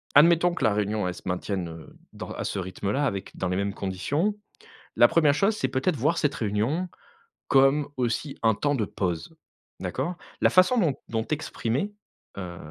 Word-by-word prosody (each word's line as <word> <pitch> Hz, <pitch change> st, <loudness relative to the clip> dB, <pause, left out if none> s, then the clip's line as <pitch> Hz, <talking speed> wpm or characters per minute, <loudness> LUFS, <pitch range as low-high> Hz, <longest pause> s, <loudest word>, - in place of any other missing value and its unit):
admettons 170 Hz, +4 st, +6 dB
que -, -, -3 dB
la 110 Hz, -, +4 dB
réunion 105 Hz, -1 st, 0 dB
elle 90 Hz, -, -2 dB
se -, -, -12 dB
maintienne, 90 Hz, 0 st, -2 dB
heu, 80 Hz, -1 st, -11 dB, 0.2 s
dans -, -, -7 dB
à -, -, -4 dB
ce -, -, -3 dB
rythme-là 100 Hz, +8 st, -1 dB
avec 100 Hz, -7 st, -4 dB
dans 95 Hz, -, -1 dB
les 90 Hz, -, -1 dB
mêmes 100 Hz, 0 st, -1 dB
conditions, 100 Hz, -, -1 dB, 0.6 s
la -, -, +8 dB
1re 150 Hz, -4 st, +4 dB
chose 195 Hz, +7 st, +2 dB
c'est -, -, -1 dB
peut-être 145 Hz, +5 st, 0 dB
voir 150 Hz, +7 st, +1 dB
cette 145 Hz, -3 st, +1 dB
réunion 115 Hz, -, -1 dB, 0.6 s
comme 135 Hz, +2 st, +4 dB
aussi 125 Hz, +4 st, -1 dB
un 110 Hz, -2 st, +3 dB
temps 145 Hz, +6 st, 0 dB
de 110 Hz, -5 st, 0 dB
pause. 90 Hz, -, -3 dB, 0.4 s
D'accord? 175 Hz, -, -3 dB, 0.3 s
La -, -, +5 dB
façon 185 Hz, +7 st, +5 dB
dont 160 Hz, -10 st, +2 dB
dont 110 Hz, -1 st, -1 dB
tu 155 Hz, -, -1 dB
exprimais, 145 Hz, -, -2 dB, 0.4 s
heu, 90 Hz, -2 st, -6 dB
125 Hz, 185 wpm, -26 LUFS, 100-155 Hz, 0.6 s, la